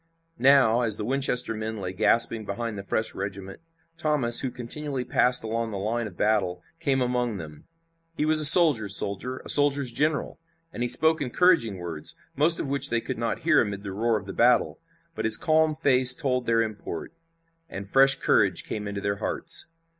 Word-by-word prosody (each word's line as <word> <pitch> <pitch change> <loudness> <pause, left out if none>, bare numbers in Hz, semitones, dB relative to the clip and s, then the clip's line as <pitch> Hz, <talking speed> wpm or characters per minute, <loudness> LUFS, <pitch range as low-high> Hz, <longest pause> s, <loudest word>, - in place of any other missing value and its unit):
Now, 130 -3 +3
as 110 -3 -1
the 105 - -6
Winchester 130 -2 -2
men 110 0 -6
lay 95 -2 -7
gasping 110 +2 +1
behind 110 +2 -6
the 100 - -7
fresh 110 +3 -2
regiment, 95 0 -8 0.4
Thomas, 145 -8 +4
who 130 - +1
continually 130 +2 -5
passed 125 0 +1
along 115 +1 -4
the 105 - -7
line 110 +4 -4
of 90 -5 -14
battle, 95 -4 -2 0.2
came 140 -5 -1
among 125 -3 -3
them. 75 -4 -12 0.5
He 150 - -2
was 155 0 +5
a 155 - +6
soldier's 140 - +8
soldier, 125 +7 -3
a - - -8
soldier's 145 -3 +1
general, 150 +4 -3 0.3
and - - -8
he 120 - -2
spoke 160 +3 +2
encouraging 145 - 0
words, 85 -4 -7 0.2
most 160 +5 +1
of - - -5
which 140 0 -3
they 120 - -1
could 115 - -7
not 115 -1 -4
hear 165 0 +2
amid 100 -2 -5
the 100 - -7
roar 110 +3 -1
of 100 - -10
the 95 - -9
battle, 120 +4 +1 0.3
but 165 - -6
his 110 -1 +5
calm 160 -1 0
face 130 -4 +5
told 125 -2 -2
their 115 0 +1
import, 110 - -8 0.6
and 100 0 -8
fresh 135 +4 +4
courage - - 0
came 105 -1 -7
into 100 0 -6
their 100 0 -3
hearts. - - -1
120 Hz, 190 wpm, -24 LUFS, 105-140 Hz, 0.6 s, soldier's